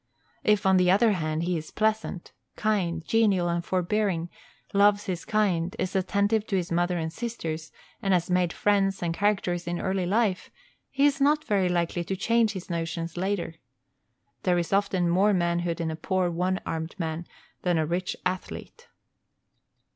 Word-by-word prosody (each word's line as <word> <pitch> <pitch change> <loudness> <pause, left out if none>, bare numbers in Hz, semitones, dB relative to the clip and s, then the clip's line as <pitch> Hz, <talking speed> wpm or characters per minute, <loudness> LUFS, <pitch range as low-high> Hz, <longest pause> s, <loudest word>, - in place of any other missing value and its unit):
If, 210 -2 +2
on 190 -1 +5
the 180 -1 +4
other 215 +4 +5
hand, 155 -4 -1
he 180 +1 0
is 155 - -10
pleasant, 215 -4 -1 0.2
kind, 175 -6 0
genial, 200 -5 +3
and 170 0 -1
forbearing, 185 -1 0 0.4
loves 205 +1 +4
his 180 -4 -4
kind, 185 -5 +1
is 185 - -3
attentive 200 +3 +1
to 195 - -1
his 175 -2 -1
mother 175 +1 +1
and 160 -1 -3
sisters, 165 -9 -5 0.3
and 195 - 0
has 175 -2 +2
made 180 -2 +2
friends 195 -1 +1
and 170 -1 0
character 195 -2 +1
in 175 0 -2
early 190 -2 -1
life, 205 -1 +1 0.4
he 275 +1 +2
is 285 -1 +2
not 300 +2 +3
very 195 -7 +1
likely 175 0 0
to 190 - -2
change 230 +2 +2
his 190 -3 -7
notions 165 -1 -3
later. 185 -2 -2 0.9
There 180 +3 +2
is 170 +1 -1
often 195 -3 +2
more 190 +5 +3
manhood 170 -1 0
in 165 -1 -1
a - - -4
poor 180 +2 0
one 180 +2 0
armed 160 0 -4
man 165 -1 -3 0.3
than 175 -2 +1
a 160 - +1
rich 175 +3 -2
athlete. 185 - -5
185 Hz, 170 wpm, -27 LUFS, 170-205 Hz, 0.9 s, on